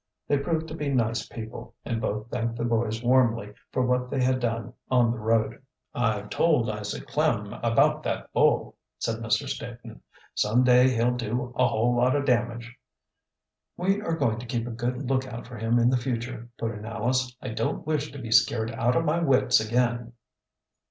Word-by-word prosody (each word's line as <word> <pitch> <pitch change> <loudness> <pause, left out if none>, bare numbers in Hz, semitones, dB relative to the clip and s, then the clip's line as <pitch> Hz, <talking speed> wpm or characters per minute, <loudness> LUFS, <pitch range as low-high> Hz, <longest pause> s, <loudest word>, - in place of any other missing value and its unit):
They 145 - +2
proved 160 +2 -1
to - - -6
be 150 -3 -3
nice 115 -4 0
people, 110 0 -8
and 115 -1 -2
both 105 +2 -3
thanked 115 0 -2
the 120 0 -2
boys 115 -1 0
warmly 120 -4 +2 0.2
for 130 - +1
what 125 0 0
they 135 - -2
had 130 0 +2
done 115 -3 -2 0.2
on 125 -3 +4
the 120 - -4
road. 110 +1 0 0.3
"I've 105 -4 -1
told 125 -10 +2
Isaac 105 -1 -5
Klem - - 0
about - - +3
that - - -4
bull," - - +2 0.2
said - - -2
Mr. - - 0
Staton. - - -7 0.3
"Some 115 +4 +2
day 125 0 +6
he'll 120 0 +2
do 120 +1 -3
a 125 - +4
whole 120 +3 +1
lot 125 +3 +3
of 140 -1 0
damage." 120 -1 0 1.0
"We 195 +3 +1
are 165 -6 -1
going 115 -7 +1
to 120 - -8
keep 115 -1 -2
a 120 - -5
good 125 +3 -3
lookout 130 -2 -2
for 120 0 -9
him 115 +2 +2
in 120 +1 +4
the 130 - +3
future," 120 -1 -4
put 115 -1 -2
in 105 -1 -8
Alice. 125 +3 -1
"I - - -6
don't 110 0 -2
wish 150 -1 -1
to 140 - -9
be 115 -4 -7
scared 110 0 +3
out 120 +2 +1
of 165 - +2
my 160 +2 +2
wits 130 -5 +4
again." 120 +1 0
120 Hz, 190 wpm, -26 LUFS, 115-130 Hz, 1.0 s, day